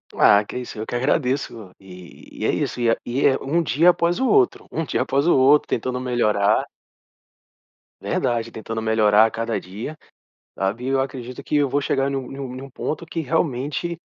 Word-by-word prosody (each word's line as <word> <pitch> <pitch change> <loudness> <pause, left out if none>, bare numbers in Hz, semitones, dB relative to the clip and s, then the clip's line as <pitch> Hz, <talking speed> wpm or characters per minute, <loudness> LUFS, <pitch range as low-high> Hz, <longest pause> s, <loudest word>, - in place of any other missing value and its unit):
Ah, 105 +1 +6
que - - -9
é - - -2
isso. 120 -3 -8
Eu 110 - -3
que - - -5
agradeço. 125 - -1
E 90 -2 -13
e - - -2
é - - +3
isso, - - -2
e 120 -1 +2
é 115 - +2
e 125 +4 -1
é 135 - +4
um 165 +5 +1
dia 160 +4 +4
após 175 +2 +1
o 265 - +1
outro, 395 +2 +2
um 165 - -2
dia - - -1
após 140 +4 0
o 175 - +5
outro 135 +3 +5
tentando 125 +2 -2
melhorar 110 -5 +1 1.3
Verdade, 115 -1 -1
tentando 110 0 -5
melhorar 110 -1 +4
a 115 - -1
cada 115 0 -2
dia, 110 +12 -8 0.6
sabe, 100 +6 -2
e - - -3
eu 135 0 +2
acredito 130 -2 -5
que - - -3
eu 145 -2 +3
vou 140 - +1
chegar 140 -1 0
num 135 -2 -4
num 135 -2 -6
num 135 +2 -8
ponto 155 +5 -4
que 165 0 -4
realmente 150 +2 -1
130 Hz, 200 wpm, -22 LUFS, 115-145 Hz, 1.3 s, Ah